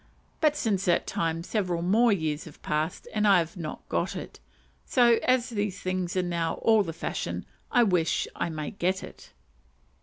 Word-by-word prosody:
But 305 Hz, -2 st, +3 dB
since 210 Hz, -9 st, 0 dB
that 175 Hz, -2 st, +2 dB
time 165 Hz, 0 st, -1 dB
several 180 Hz, -4 st, -1 dB
more 220 Hz, +6 st, +4 dB
years 160 Hz, -5 st, -1 dB
have 160 Hz, -, -13 dB
passed, 155 Hz, +3 st, -2 dB
and 215 Hz, -1 st, +2 dB
I 195 Hz, -2 st, +7 dB
have 170 Hz, -1 st, -1 dB
not 160 Hz, -4 st, -7 dB
got -, -, -1 dB
it; -, -, -7 dB, 0.4 s
so, 235 Hz, -3 st, +4 dB
as 255 Hz, -1 st, +2 dB
these 205 Hz, -4 st, -2 dB
things 185 Hz, -1 st, -2 dB
are 185 Hz, -, +2 dB
now 170 Hz, -2 st, -1 dB
all 220 Hz, -1 st, +4 dB
the 170 Hz, -5 st, -3 dB
fashion, 165 Hz, -, -4 dB, 0.3 s
"I 245 Hz, -2 st, +5 dB
wish 180 Hz, -6 st, +1 dB
I -, -, -1 dB
may 155 Hz, -2 st, -4 dB
get 190 Hz, 0 st, -1 dB
it." -, -, -12 dB
185 Hz, 180 wpm, -27 LUFS, 165-215 Hz, 0.4 s, I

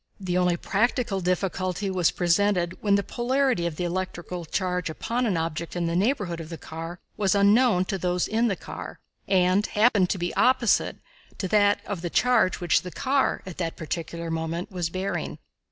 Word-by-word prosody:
The 185 Hz, -2 st, -2 dB
only 180 Hz, -1 st, +2 dB
practical 220 Hz, 0 st, 0 dB
difficulty 185 Hz, +1 st, -1 dB
was 180 Hz, -3 st, +3 dB
presented 180 Hz, 0 st, +1 dB
when 200 Hz, -2 st, +3 dB
the 200 Hz, -, +1 dB
polarity 250 Hz, -5 st, 0 dB
of 165 Hz, -, -4 dB
the 180 Hz, -, -3 dB
electrical 180 Hz, -1 st, -4 dB
charge 180 Hz, 0 st, -1 dB
upon 235 Hz, +9 st, -1 dB
an 190 Hz, -6 st, +1 dB
object 165 Hz, +1 st, -3 dB
in 175 Hz, -1 st, -1 dB
the 170 Hz, 0 st, -1 dB
neighborhood 195 Hz, -4 st, 0 dB
of 160 Hz, -1 st, -7 dB
the 165 Hz, -, -6 dB
car 165 Hz, +3 st, -7 dB, 0.2 s
was 200 Hz, -1 st, +2 dB
unknown 200 Hz, -1 st, +4 dB
to 195 Hz, 0 st, -3 dB
those 180 Hz, +1 st, 0 dB
in 230 Hz, +2 st, +1 dB
the 200 Hz, -, 0 dB
car, -, -, -8 dB, 0.3 s
and 185 Hz, +1 st, +3 dB
happened 210 Hz, -4 st, +3 dB
to -, -, 0 dB
be 175 Hz, -1 st, -2 dB
opposite 250 Hz, -2 st, +3 dB, 0.4 s
to 190 Hz, -, -2 dB
that 205 Hz, 0 st, +3 dB
of 200 Hz, -5 st, -4 dB
the 175 Hz, -, -3 dB
charge 245 Hz, -2 st, +3 dB
which 175 Hz, -2 st, +2 dB
the 180 Hz, -, -7 dB
car, 270 Hz, +7 st, 0 dB
at 185 Hz, -2 st, -8 dB
that 165 Hz, -2 st, -3 dB
particular 165 Hz, +1 st, -4 dB
moment, 165 Hz, +3 st, -3 dB
was 175 Hz, -3 st, -2 dB
bearing. 185 Hz, +3 st, -3 dB
185 Hz, 185 wpm, -26 LUFS, 175-205 Hz, 0.4 s, unknown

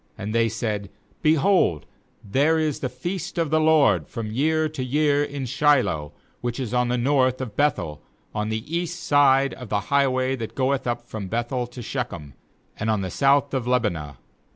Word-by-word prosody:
19And 100 Hz, +2 st, -4 dB
they 115 Hz, 0 st, +3 dB
said: 105 Hz, -3 st, -3 dB, 0.2 s
' -, -, -36 dB
Behold, 155 Hz, -, +3 dB, 0.4 s
there 140 Hz, +10 st, +2 dB
is 155 Hz, -3 st, 0 dB
the 130 Hz, -, -2 dB
feast 175 Hz, +9 st, -5 dB
of 165 Hz, -3 st, 0 dB
the 155 Hz, -, +4 dB
LORD 145 Hz, -, +4 dB
from 110 Hz, -2 st, -5 dB
year 155 Hz, +6 st, +1 dB
to 150 Hz, -4 st, -5 dB
year 145 Hz, +2 st, +2 dB
in 140 Hz, -2 st, -4 dB
Shiloh, 130 Hz, -, +2 dB, 0.3 s
which 120 Hz, +1 st, -3 dB
is 125 Hz, -3 st, -4 dB
on 125 Hz, 0 st, +2 dB
the 125 Hz, +1 st, 0 dB
north 130 Hz, 0 st, +2 dB
of 125 Hz, -6 st, -5 dB
Beth 145 Hz, -1 st, +2 dB
el, 75 Hz, -1 st, -6 dB, 0.3 s
on 105 Hz, 0 st, -2 dB
the 110 Hz, 0 st, -2 dB
east 175 Hz, 0 st, -3 dB
side 140 Hz, -3 st, +4 dB
of 125 Hz, -4 st, -9 dB
the 105 Hz, -, +1 dB
highway 130 Hz, -2 st, +2 dB
that 115 Hz, -2 st, -6 dB
goeth 135 Hz, -1 st, 0 dB
up 120 Hz, 0 st, -2 dB
from 105 Hz, -3 st, -6 dB
Beth 120 Hz, +4 st, -2 dB
el 125 Hz, -2 st, -1 dB
to 125 Hz, 0 st, -9 dB
Shechem, 95 Hz, -, -5 dB, 0.5 s
and 110 Hz, -, -1 dB
on 110 Hz, -2 st, +1 dB
the 95 Hz, -1 st, -4 dB
south 140 Hz, 0 st, +3 dB
of 130 Hz, -3 st, -1 dB
Lebonah.' 85 Hz, -, -1 dB
130 Hz, 195 wpm, -24 LUFS, 110-145 Hz, 0.5 s, the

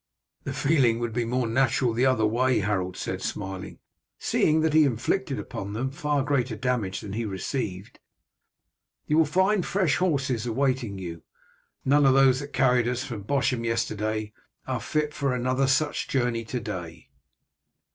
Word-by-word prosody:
"The -, -, -3 dB
feeling 135 Hz, -7 st, +3 dB
would 120 Hz, -1 st, -3 dB
be 120 Hz, 0 st, 0 dB
more 125 Hz, +2 st, 0 dB
natural 120 Hz, 0 st, +2 dB
the 125 Hz, +3 st, +2 dB
other 120 Hz, -4 st, +3 dB
way," 125 Hz, +3 st, +2 dB
Harold 95 Hz, -2 st, -1 dB
said -, -, -4 dB
smiling, 95 Hz, -2 st, -5 dB, 0.4 s
"seeing 155 Hz, +1 st, +2 dB
that 160 Hz, -1 st, +1 dB
he 155 Hz, 0 st, +6 dB
inflicted 140 Hz, -, 0 dB
upon 100 Hz, -4 st, -6 dB
them 130 Hz, +5 st, -2 dB
far 145 Hz, 0 st, 0 dB
greater 130 Hz, -5 st, 0 dB
damage 115 Hz, -6 st, -1 dB
than 100 Hz, -3 st, -7 dB
he 115 Hz, +2 st, -2 dB
received. 100 Hz, -1 st, -4 dB, 1.1 s
You 155 Hz, +2 st, +2 dB
will 160 Hz, -, +5 dB
find 190 Hz, +5 st, +2 dB
fresh 175 Hz, -9 st, +1 dB
horses 135 Hz, -, 0 dB
awaiting 125 Hz, -4 st, 0 dB
you. 85 Hz, -3 st, -7 dB, 0.6 s
None 145 Hz, +1 st, +4 dB
of 135 Hz, -, +5 dB
those 135 Hz, -1 st, +5 dB
that 145 Hz, 0 st, -7 dB
carried 125 Hz, -2 st, +3 dB
us 125 Hz, +1 st, -1 dB
from 120 Hz, -7 st, -6 dB
Bosham 130 Hz, -2 st, 0 dB
yesterday 110 Hz, -2 st, -2 dB, 0.3 s
are -, -, -2 dB
fit 150 Hz, -1 st, -1 dB
for 140 Hz, -3 st, -1 dB
another 130 Hz, +2 st, +1 dB
such 145 Hz, +3 st, +1 dB
journey 120 Hz, -3 st, 0 dB
to 125 Hz, +3 st, -3 dB
day." 95 Hz, -8 st, -7 dB
125 Hz, 160 wpm, -26 LUFS, 110-140 Hz, 1.1 s, he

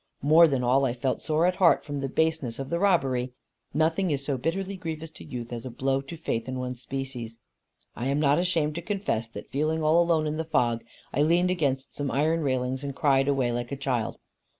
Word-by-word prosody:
More 160 Hz, +4 st, +7 dB
than 135 Hz, -4 st, 0 dB
all 130 Hz, +3 st, +3 dB
I 130 Hz, -3 st, +1 dB
felt 130 Hz, +1 st, -1 dB
sore 155 Hz, +1 st, +1 dB
at 180 Hz, 0 st, +1 dB
heart 175 Hz, -3 st, +4 dB
from 145 Hz, -1 st, -4 dB
the 135 Hz, 0 st, -2 dB
baseness 160 Hz, -6 st, 0 dB
of 135 Hz, 0 st, -6 dB
the 170 Hz, -, 0 dB
robbery. 130 Hz, -10 st, +2 dB, 0.4 s
Nothing 160 Hz, +5 st, +1 dB
is 140 Hz, -2 st, -1 dB
so 140 Hz, -, 0 dB
bitterly 190 Hz, +9 st, -2 dB
grievous 160 Hz, -3 st, -6 dB
to -, -, -12 dB
youth 120 Hz, -1 st, -6 dB
as 115 Hz, -1 st, -5 dB
a 130 Hz, -, -5 dB
blow 135 Hz, +3 st, 0 dB
to 140 Hz, +5 st, -9 dB
faith 115 Hz, -6 st, -2 dB
in 130 Hz, 0 st, -3 dB
one's 125 Hz, -1 st, -4 dB
species. 130 Hz, -4 st, -5 dB, 0.6 s
I 120 Hz, -, -3 dB
am 140 Hz, +2 st, +1 dB
not 145 Hz, +1 st, +3 dB
ashamed 165 Hz, -4 st, +1 dB
to 170 Hz, -, -4 dB
confess 175 Hz, -, -2 dB
that -, -, -10 dB
feeling 155 Hz, +3 st, 0 dB
all 160 Hz, +3 st, +5 dB
alone 165 Hz, -2 st, +2 dB
in 155 Hz, 0 st, -2 dB
the 160 Hz, -, -1 dB
fog, 120 Hz, -7 st, +1 dB, 0.3 s
I 140 Hz, -, +1 dB
leaned 175 Hz, +4 st, +3 dB
against 140 Hz, -6 st, -1 dB
some 145 Hz, -1 st, -2 dB
iron 155 Hz, +5 st, +1 dB
railings 130 Hz, -2 st, -1 dB
and 140 Hz, -1 st, -4 dB
cried 135 Hz, -2 st, +3 dB
away 135 Hz, -4 st, +1 dB
like 120 Hz, +1 st, -3 dB
a 140 Hz, -, -3 dB
child. 130 Hz, -5 st, -1 dB
140 Hz, 220 wpm, -27 LUFS, 130-160 Hz, 0.6 s, More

